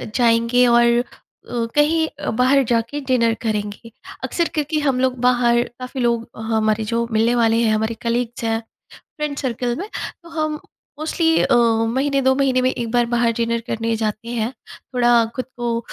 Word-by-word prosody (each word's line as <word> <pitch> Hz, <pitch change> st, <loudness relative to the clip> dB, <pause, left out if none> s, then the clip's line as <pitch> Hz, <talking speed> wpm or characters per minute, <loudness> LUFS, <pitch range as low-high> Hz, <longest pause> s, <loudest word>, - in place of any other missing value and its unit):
जाएँगे 235 Hz, +1 st, +3 dB
और 240 Hz, 0 st, +5 dB, 0.2 s
अ, -, -, 0 dB, 0.7 s
कहीं 315 Hz, +2 st, +3 dB
अ, 295 Hz, -, -3 dB
बाहर 260 Hz, +4 st, +3 dB
जाके 235 Hz, +5 st, 0 dB
डिनर 235 Hz, -3 st, +3 dB
करेंगे। 210 Hz, +1 st, -3 dB, 0.3 s
अक्सर 340 Hz, -1 st, 0 dB
क्योंकि 305 Hz, 0 st, -1 dB
हम 270 Hz, -4 st, +1 dB
लोग 255 Hz, -1 st, +1 dB
बाहर, 240 Hz, -1 st, +3 dB, 0.2 s
काफ़ी 255 Hz, +1 st, -5 dB
लोग 235 Hz, -1 st, 0 dB, 0.2 s
हमारे 220 Hz, 0 st, +1 dB
जो 235 Hz, +1 st, -1 dB
मिलने 225 Hz, +2 st, +2 dB
वाले 230 Hz, -1 st, +3 dB
हैं, 220 Hz, -1 st, +2 dB
हमारे 220 Hz, +1 st, -1 dB
कलीग्स 235 Hz, 0 st, -2 dB
हैं, 225 Hz, 0 st, 0 dB, 0.6 s
फ्रेंड 300 Hz, -2 st, -3 dB
सर्किल 245 Hz, -2 st, -2 dB
में, 400 Hz, +4 st, -5 dB, 0.3 s
तो 335 Hz, -, -14 dB
हम 310 Hz, -2 st, -2 dB, 0.4 s
मोस्टली 325 Hz, +1 st, +1 dB
अ, 260 Hz, -, +2 dB
महीने, 240 Hz, +4 st, +2 dB
2 265 Hz, 0 st, +4 dB
महीने 265 Hz, -2 st, +2 dB
में 255 Hz, -, +3 dB
एक 235 Hz, -3 st, -4 dB
बार 240 Hz, 0 st, +2 dB
बाहर 235 Hz, -1 st, +1 dB
डिनर 235 Hz, 0 st, 0 dB
करने 230 Hz, 0 st, -1 dB
जाते 215 Hz, +1 st, -3 dB
हैं, 235 Hz, +1 st, -2 dB, 0.4 s
थोड़ा 240 Hz, -1 st, +4 dB
खुद 255 Hz, -, -2 dB
को 235 Hz, -1 st, -1 dB
240 Hz, 170 wpm, -20 LUFS, 230-265 Hz, 0.7 s, और